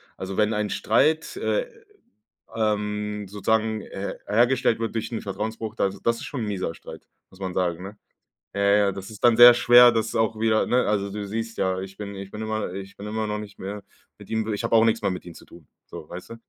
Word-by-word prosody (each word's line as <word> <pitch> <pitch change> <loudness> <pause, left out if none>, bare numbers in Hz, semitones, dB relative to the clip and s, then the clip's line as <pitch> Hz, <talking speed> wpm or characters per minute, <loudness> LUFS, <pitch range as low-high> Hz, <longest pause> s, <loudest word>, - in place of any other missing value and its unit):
also 95 0 -6
wenn 105 +1 +2
ein 105 -1 -1
Streit, 160 - +1
äh, - - -1 0.9
ähm, 105 -1 -1
sozusagen 110 +2 0
her 100 +1 -6
hergestellt 120 +2 +2
wird 115 0 -3
durch 115 +1 -3
'n 115 - -2
Vertrauensbruch, 110 +2 -5
das 100 -3 -1
das 115 0 +2
ist - - -8
schon 140 -6 -4
'n - - -3
mieser 95 -5 -3
Streit, - - -12 0.2
muss 95 - -19
man 95 -1 -4
sagen, 90 -1 -1
ne? 100 +2 -9 0.6
Ja, 100 - -2
ja, 100 0 +4
das 95 +2 -8
ist 105 - -12
dann 120 -2 +5
sehr 120 0 +11
schwer, 120 0 +7
das 110 -1 -1
auch 110 0 0
wieder, 110 -1 +3
ne 125 +1 +2
also 100 -1 0
du 100 0 -5
siehst 115 +2 -5
ja, 95 0 0
ich 95 0 -8
bin 100 -1 -6
ich 95 0 -8
bin 105 - -8
immer 110 -3 -3
ich 95 0 -8
bin 100 - -8
immer 110 0 -2
noch 105 0 -3
nicht 105 -1 -9
mehr 100 +1 -6 0.4
mit - - -14
ihm 110 0 -1
ich 110 - -4
habe 115 - 0
auch 110 0 +6
nix 115 0 +1
mehr - - +1
mit 90 - -5
ihm 85 - -10
zu - - -14
tun, 85 -4 -16 0.2
so, 75 - -10
weißt 90 +4 -9
du? - - -6
105 Hz, 235 wpm, -24 LUFS, 100-115 Hz, 0.9 s, sehr